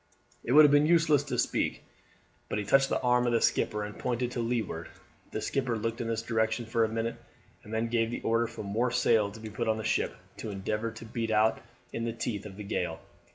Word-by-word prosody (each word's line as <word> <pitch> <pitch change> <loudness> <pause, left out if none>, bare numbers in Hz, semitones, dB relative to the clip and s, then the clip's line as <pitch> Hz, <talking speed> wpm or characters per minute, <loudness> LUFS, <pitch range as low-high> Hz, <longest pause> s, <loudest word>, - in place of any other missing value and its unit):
It 120 - 0
would 155 +1 +9
have 145 - +5
been 145 +1 +5
useless 160 -4 +4
to 145 - -3
speak, - - 0 0.7
but - - -1
he 105 - -2
touched 135 +5 +4
the - - +1
arm 125 0 +3
of 120 - +1
the 115 - +4
skipper 105 -1 +1
and 105 0 -7
pointed 125 0 -1
to 125 - -4
leeward. 115 -8 -2 0.4
The - - -4
skipper 130 -4 0
looked 115 +2 -2
in 115 - -3
this 115 0 -1
direction 110 0 0
for 115 0 +1
a 110 - +1
minute 115 +1 -2 0.5
and 105 - -12
then 110 +1 0
gave 115 -1 +1
the 120 - -4
order 115 +1 +2
for 115 -1 -7
more 110 +5 0
sail 115 -4 +3
to 105 +2 -11
be 110 -1 -8
put 115 +2 -3
on 110 0 +2
the 110 - -4
ship, - - 0 0.2
to 110 - -5
endeavour 105 +3 -2
to 115 0 -10
beat 115 0 -3
out 110 0 +3 0.3
in 115 - -2
the 115 - -2
teeth 110 -3 -3
of 95 -1 -11
the 105 - -6
gale. 100 - -2
115 Hz, 240 wpm, -29 LUFS, 110-120 Hz, 0.7 s, would